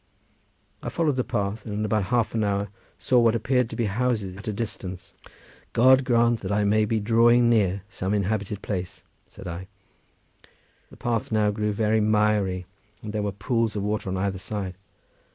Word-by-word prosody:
I - - -4
followed 160 -5 0
the 125 - +2
path, 100 +1 -2
and 105 - -5
in 105 +1 -1
about 105 -2 +1
half 120 +1 +1
an 110 -1 +1
hour 100 0 0 0.3
saw 125 - +3
what 115 -1 +4
appeared 125 +1 +1
to - - -6
be 115 - 0
houses 105 -3 -1
at 100 +4 -11
a - - 0
distance. 95 -4 -6 0.6
"God 130 +2 +5
grant 120 -2 +3
that 95 - -4
I 105 +1 +2
may 105 +1 +3
be 110 +1 0
drawing 120 +2 +4
near 100 -4 +2
some 95 -2 -4
inhabited 100 0 -2
place," 90 -3 -4 0.2
said - - -11
I. 90 +2 -6 1.2
The - - -15
path 115 -2 -2
now 105 -1 +2
grew 105 0 -1
very 110 +1 +1
miry, 105 -3 +1 0.4
and 105 -1 -6
there 105 - -1
were 105 0 -1
pools 115 +1 -1
of 100 - -2
water 105 -1 -2
on 95 - -2
either 95 0 -1
side. 95 -2 -4
105 Hz, 185 wpm, -25 LUFS, 100-115 Hz, 1.2 s, God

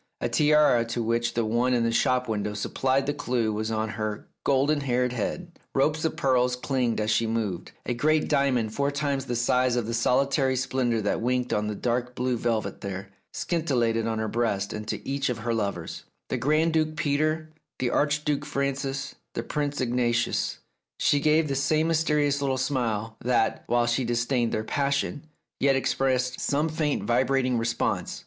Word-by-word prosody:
A - - -1
tiara 150 -2 +4
to 115 0 -2
which 115 +1 0
the 115 -1 +1
one 120 +3 +2
in 120 - +2
the 115 - +1
shop 125 +2 +2
window 105 -1 -2
sup 105 - -4
plied 135 +1 +1
the 145 - 0
clue 120 -6 -1
was 110 +1 -2
on 110 0 -1
her 110 -1 -4 0.2
golden 145 +2 +2
haired 125 -2 0
head, 170 - -4 0.2
ropes 150 +3 +2
of 160 - 0
pearls 125 -2 +2
clinked 125 -3 -1
as 110 +1 0
she 115 +1 +2
moved, 110 -6 -2
a 120 - -1
great 155 +5 +2
diamond 125 -6 +1
four 140 +2 +1
times 140 -2 -1
the 120 - -2
size 125 +1 +2
of 120 -3 0
the 115 - -3
solitary 130 +3 +2
splendour 125 -3 0
that 105 - -1
winked 125 +1 0
on 105 0 0
the 105 - -3
dark 125 +2 -1
blue 125 0 0
velvet 115 -2 -2
there, 100 0 -6 0.2
scintillated 120 -9 0
on 110 -1 -1
her 110 0 -1
breast, 105 -4 -1
and 105 0 -6
to - - -4
each 140 0 -1
of 125 - -1
her 115 +1 -2
lovers, 100 -6 -3 0.2
the - - -1
Grand 155 +3 +2
Duke 155 -1 +1
Peter, 155 +2 0 0.3
the 125 -2 -1
Archduke 150 0 +1
Francis, 140 -1 -2 0.2
the - - -2
Prince 145 -1 -2
Ignatius, 120 -1 0 0.4
she 145 - +3
gave 155 +2 +3
the 140 - -1
same 155 +3 +1
mysterious 150 -3 +2
little 135 -2 0
smile, 115 -5 -1
that, 120 -2 +1
while 120 0 +2
she 120 +2 +1
disdained 120 0 0
their 110 - -1
passion, 140 +4 -1 0.3
yet 135 0 +3
expressed 130 -1 0
some 150 +3 0
faint 155 -2 -1
vibrating 125 +1 +2
response. 115 +1 -1
125 Hz, 180 wpm, -26 LUFS, 115-140 Hz, 0.4 s, tiara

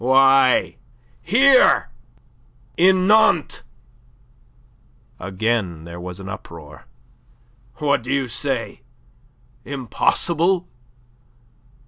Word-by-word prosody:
Why, 135 +1 +3 0.4
here 260 +7 +3 0.8
in 185 +1 +3
Nantes." 205 -6 +2 1.6
Again 95 -3 -3
there 85 +1 -10
was 90 +1 -8
uproar. 85 -6 -11 0.9
"What 145 -2 0
do 120 - -7
you 135 -2 -1
say? 130 0 -4 0.8
Impossible? 170 +7 -1
130 Hz, 65 wpm, -20 LUFS, -, 1.6 s, Why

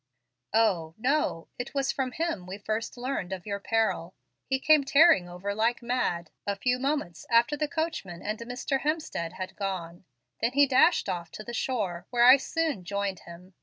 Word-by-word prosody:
"O, 180 -8 +2
no. 250 - 0
It 245 +3 -5
was 275 -1 +1
from 260 -2 -2
him 320 - -2
we 190 +2 -6
first 215 +4 -3
learned 245 -7 -3
of 185 -2 -5
your 200 -1 -3
peril. 225 +2 0 0.3
He 265 - +1
came 295 +2 +4
tearing 275 - +5
over 180 +3 -4
like 230 +3 0
mad, 235 -9 -1 0.2
a 200 - 0
few 245 +5 0
moments 270 - -2
after 235 +5 +4
the 300 +1 -1
coachman 290 - -4
and 215 +1 -3
Mr. 245 +3 -2
Hemstead 295 - -2
had 185 0 -6
gone; 180 -3 -5 0.4
then 235 +2 +1
he 285 +1 +6
dashed 275 +6 +4
off 170 -2 -3
to 215 - -7
the 235 - -7
shore, 195 -9 -2
where 240 -1 +4
I 255 +2 +10
soon 300 - -2
joined 200 0 -2
him. 180 +3 -13
225 Hz, 180 wpm, -28 LUFS, 185-270 Hz, 0.4 s, I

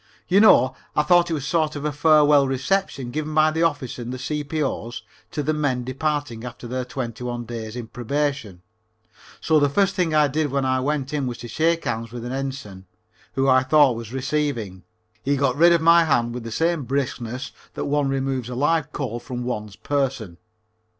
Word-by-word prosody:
You 190 +2 +4
know, 130 - +6 0.2
I 150 - +3
thought 175 +1 +4
it 165 - 0
was 145 - -4
a - - -5
sort 155 -1 0
of 145 0 -5
a 150 - 0
farewell 150 -1 +5
reception 135 -1 -1
given 155 +2 -3
by 155 0 +5
the 160 +1 -1
officers 145 -7 -1
and 120 +1 -5
the 130 - -4
C.P.O.'s 145 -5 -3 0.3
to 150 - -3
the 155 +2 0
men 140 -5 0
departing 135 -2 -2
after 125 0 -8
their 125 +1 -3
twenty 125 -2 -5
one 120 -1 -4
days 110 -1 -6
in 120 -2 -5
Probation, 125 -5 -3 0.8
so 160 -1 +3
the 145 -1 +3
first 195 +6 +2
thing 170 -5 0
I 150 -1 +5
did 150 +2 -1
when 135 0 0
I 130 0 +1
went 140 +1 -2
in 140 -3 -1
was 120 -2 -4
to 120 - -8
shake 165 +7 0
hands 115 -2 -3
with 120 -1 -7
an 120 - -4
Ensign, 130 -9 -5 0.5
who 135 0 +1
I 130 -1 +5
thought 140 -1 +4
was 115 -1 -7
receiving. 130 -8 -2 0.4
He 140 +1 +1
got 135 -2 +1
rid 170 +4 +6
of 170 -1 +4
my 170 0 +6
hand 120 -6 +1
with 120 -1 -6
the 115 - -6
same 165 +3 0
briskness 130 -1 -3 0.2
that - - -3
one 145 -1 +1
removes 135 -2 -2
a 125 - -5
live 150 +2 +1
coal 120 -5 -4
from 120 +1 -6
one's 105 -4 -4
person. 125 -11 -2
135 Hz, 205 wpm, -23 LUFS, 120-150 Hz, 0.8 s, know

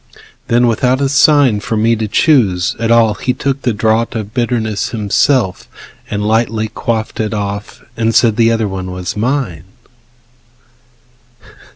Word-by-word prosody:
Then, 120 +1 +3
without 125 +3 +1
a 140 - +1
sign 140 -5 +4
For 110 +1 -3
me 115 +2 +2
to 110 -1 -3
choose 105 - +2
at 115 0 -1
all, 115 -2 +4
he 125 +5 -2
took 140 0 -2
the 125 - 0
draught 110 +2 0
Of 110 -1 -5
bitterness 115 -4 -1
himself, 110 0 0 0.4
and 105 0 -2
lightly 110 0 0
quaffed 110 0 -3
It 110 0 -2
off, 100 +1 -5
and 115 0 0
said 115 -3 +4
the 115 0 +3
other 115 -2 0
one 95 -1 -5
was 90 -1 -5
mine. 110 - -2
115 Hz, 150 wpm, -14 LUFS, 105-120 Hz, 0.4 s, sign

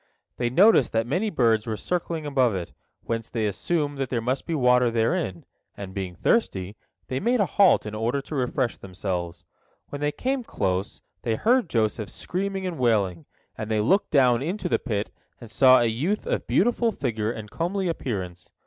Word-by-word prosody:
They 120 -1 0
noticed 180 - +5
that 115 0 +1
many 180 - 0
birds 115 - +2
were 110 -1 -2
circling 170 -1 -3
above 130 -7 +2
it, 90 -2 -5 0.3
whence 115 -1 -3
they 115 -2 -1
assumed 145 - -1
that 135 -2 -2
there 120 - 0
must 125 +4 -2
be 165 - -1
water 125 -3 +4
therein, 115 - -1 0.3
and, 100 -2 -7
being 95 -2 -4
thirsty, 100 - 0 0.3
they 130 - -2
made 240 - +1
a 205 - +4
halt 195 - +4
in 105 - -5
order 115 +5 -1
to 140 - -9
refresh 130 -2 -1
themselves. 90 -2 -5 0.4
When 145 - -6
they 145 0 +1
came 260 - -2
close, 95 - -2 0.2
they 115 -2 0
heard 240 - +2
Joseph 110 -2 0
screaming 195 +1 -3
and 175 -5 -4
wailing, 100 -9 +1 0.3
and 110 - -6
they 110 -1 +1
looked 190 - +2
down 125 -4 +4
into 180 +6 -2
the - - +1
pit 105 -5 -3 0.3
and 115 -3 -11
saw 130 +3 +6
a 120 - +2
youth 145 - -1
of - - -2
beautiful 235 +2 +2
figure 115 - -2
and 110 -3 -8
comely 185 +3 -1
appearance. 95 - -4
125 Hz, 185 wpm, -25 LUFS, 110-170 Hz, 0.4 s, saw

